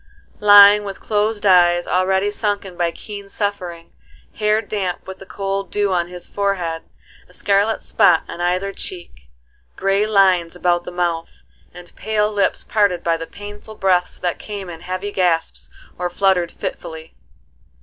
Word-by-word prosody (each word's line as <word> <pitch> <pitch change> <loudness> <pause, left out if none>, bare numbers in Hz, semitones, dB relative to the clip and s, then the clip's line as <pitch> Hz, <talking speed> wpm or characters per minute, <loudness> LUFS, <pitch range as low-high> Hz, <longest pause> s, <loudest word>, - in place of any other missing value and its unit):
Lying 205 0 +8
with 195 -1 -7
closed 210 0 -1
eyes 175 -2 +5
already 190 +2 +1
sunken 205 -3 -2
by 175 -1 0
keen 200 +3 -9
suffering, 180 -5 -4 0.4
hair 215 0 +1
damp 200 -4 -3
with 190 0 -9
the 195 - -12
cold 195 0 -3
dew 205 -2 0
on 175 -1 0
his 180 0 -9
forehead, 180 -5 -2 0.5
a - - -19
scarlet 205 +2 +1
spot 180 -6 +3
on 175 - -7
either 185 +3 0
cheek, 170 - -9 0.5
gray 195 +2 +1
lines 185 -5 +3
about 175 -1 0
the - - -6
mouth, 170 -2 -3 0.3
and 175 0 -14
pale 210 +1 0
lips 200 -2 0
parted 200 -5 +1
by 165 -1 +1
the 165 0 -6
painful 205 +1 -10
breaths 185 -3 +1
that 175 -1 -3
came 200 -4 -7
in 165 -1 -10
heavy 185 +3 -4
gasps 175 -4 0 0.3
or 180 0 -1
fluttered 180 -2 +1
fitfully. 160 0 -7
190 Hz, 150 wpm, -20 LUFS, 175-205 Hz, 0.5 s, Lying